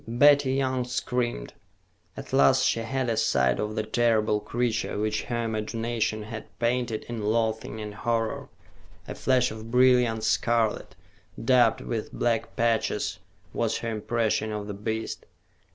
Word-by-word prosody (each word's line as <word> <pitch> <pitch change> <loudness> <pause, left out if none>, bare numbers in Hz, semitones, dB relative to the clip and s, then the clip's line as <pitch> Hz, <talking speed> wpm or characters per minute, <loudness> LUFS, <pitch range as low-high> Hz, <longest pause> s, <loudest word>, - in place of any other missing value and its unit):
Betty 140 +3 +5
Young 130 -2 0
screamed. 125 - -2 0.6
At - - -9
last 70 - +5
she - - +2
had 130 +3 -2
a 115 - +1
sight 65 - +2
of 105 0 -2
the 110 - -1
terrible 110 -1 +2
creature 120 0 -2
which 110 +1 0
her 120 -1 -2
imagination 110 0 -2
had 110 +1 -7
painted 120 -2 -1
in 120 -2 -6
loathing 110 0 -1
and 105 -1 -6
horror. 115 +1 -2 0.6
A - - -5
flash 130 -3 +2
of 110 +1 -8
brilliant 125 -2 +4
scarlet, 115 0 0 0.5
dabbed 125 -1 +4
with 115 -2 -4
black 115 -2 -1
patches, 115 -1 0 0.3
was 115 -1 0
her 115 - -4
impression 110 0 -1
of 105 -1 -4
the 105 - -5
beast. 110 +2 -4
115 Hz, 140 wpm, -26 LUFS, 110-120 Hz, 0.6 s, Betty